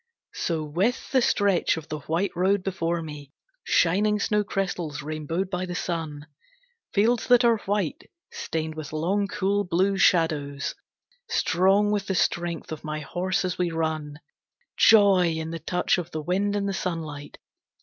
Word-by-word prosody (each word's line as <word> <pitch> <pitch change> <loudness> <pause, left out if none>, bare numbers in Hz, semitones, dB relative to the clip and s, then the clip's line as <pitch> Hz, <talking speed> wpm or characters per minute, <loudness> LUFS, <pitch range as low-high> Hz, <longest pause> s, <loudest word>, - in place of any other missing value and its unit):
So 165 -3 -2
with 185 - -1
the 260 -3 +4
stretch 200 -7 +2
of 160 - -8
the 155 - -4
white 165 +7 -1
road 190 +2 +2
before 170 -3 -2
me, 145 -3 -9 0.3
Shining 205 +5 +2
snowcrystals 195 -8 -1
rainbowed 155 +5 -3
by 185 0 -2
the 180 - -5
sun, 160 -5 -4 0.7
Fields 225 +4 +2
that 245 -1 +5
are 230 -2 +4
white, 200 -6 -2 0.2
stained 160 - -3
with 155 -1 -8
long, 190 +6 0
cool, 200 +1 0
blue 190 +2 +1
shadows, 150 -6 +2 0.6
Strong 200 - +3
with 205 -2 -1
the 190 - -1
strength 170 -2 -1
of 155 - -6
my 155 0 -4
horse 185 +5 -1
as 180 0 -3
we 180 -1 +1
run. 160 -2 -3 0.6
Joy 195 -6 +5
in 160 0 -4
the 165 - -5
touch 180 +1 0
of 175 -1 -5
the 155 -2 -4
wind 195 +5 0
and 200 -1 -1
the 195 - -1
sunlight! 155 -6 -5
180 Hz, 155 wpm, -25 LUFS, 160-200 Hz, 0.7 s, that